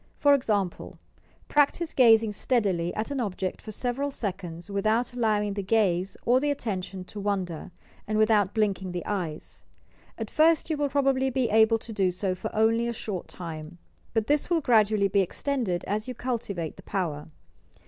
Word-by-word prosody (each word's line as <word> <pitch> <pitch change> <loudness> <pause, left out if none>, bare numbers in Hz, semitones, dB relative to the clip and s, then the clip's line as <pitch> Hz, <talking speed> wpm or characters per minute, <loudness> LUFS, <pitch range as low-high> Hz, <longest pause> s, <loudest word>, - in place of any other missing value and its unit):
For 285 -1 +5
example: 205 -9 -1 0.5
practise 295 +3 +2
gazing 225 -3 +5
steadily 200 -7 0
at 220 +6 -3
an 280 - -2
object 190 -5 -3
for 215 - -8
several 250 +6 -2
seconds 185 -8 -5
without 215 +5 0
allowing 210 -4 +1
the 200 - -3
gaze 195 -3 +1
or 250 +2 +4
the 290 +2 0
attention 195 -8 -3
to 205 +3 -9
wander, 190 -4 -2 0.4
and 215 0 0
with 215 +1 +4
out 205 -3 +3
blinking 195 -4 0
the 175 - -4
eyes. 175 -7 -4 0.6
At 225 -2 -5
first 320 +1 +3
you 310 - 0
will 290 -1 0
probably 270 -1 +2
be 255 -3 0
able 220 +1 +5
to 225 0 -9
do 195 -3 +2
so 185 +1 -1
for 185 - -5
only 225 +2 +3
a 235 - -2
short 205 -5 -5
time; 165 -1 -8 0.4
but 220 -1 +2
this 295 +5 +1
will 340 -2 +3
gradu 220 -4 +4
ally 200 -1 +3
be 195 +1 +2
extended 195 -2 -2
as 215 +3 -2
you 255 - -5
cultivate 220 -10 -3
the - - -11
power. 160 -6 -3
215 Hz, 180 wpm, -27 LUFS, 190-245 Hz, 0.6 s, For